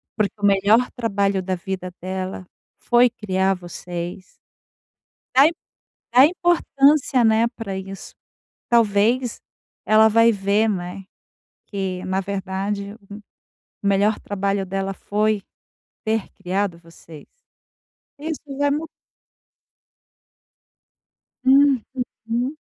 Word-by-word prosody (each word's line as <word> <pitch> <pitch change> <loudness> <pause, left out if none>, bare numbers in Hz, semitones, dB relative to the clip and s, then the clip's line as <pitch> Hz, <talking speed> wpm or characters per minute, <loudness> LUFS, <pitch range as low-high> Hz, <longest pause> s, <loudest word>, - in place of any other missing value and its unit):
porque 215 -3 0
o 205 - +2
melhor 205 +5 +4
trabalho 200 -5 0
da 185 0 -1
vida 185 0 -5
dela 185 0 -5 0.3
foi 240 +1 +4
criar 195 -4 0
vocês. 175 0 -7 1.1
Da 275 +4 +8
i - - -3 0.6
dá 260 +3 +9
importância, 295 -6 +3
né, 225 +1 +4
pra 220 -5 -6
isso. 195 0 -8 0.6
Talvez 230 +2 +2 0.5
ela 220 +1 +6
vai 230 +1 +5
ver, 200 +2 +1
né, 185 -1 -4 0.6
que 190 -3 -4
na 190 +1 -1
verdade 200 +1 -3
um 205 - -8 0.7
o - - -3
melhor 200 +2 +2
trabalho 200 -1 -2
dela 195 +1 -2
foi 210 +1 -1 0.6
ter 220 -2 -1
criado 195 -1 -2
você. 165 -2 -15 0.9
Isso 315 +1 -4 0.2
já 285 0 +2
mu 300 +3 -1 2.6
Hum, 270 -2 +5 0.5
uhum. 245 +6 -1
200 Hz, 105 wpm, -22 LUFS, 190-235 Hz, 2.6 s, dá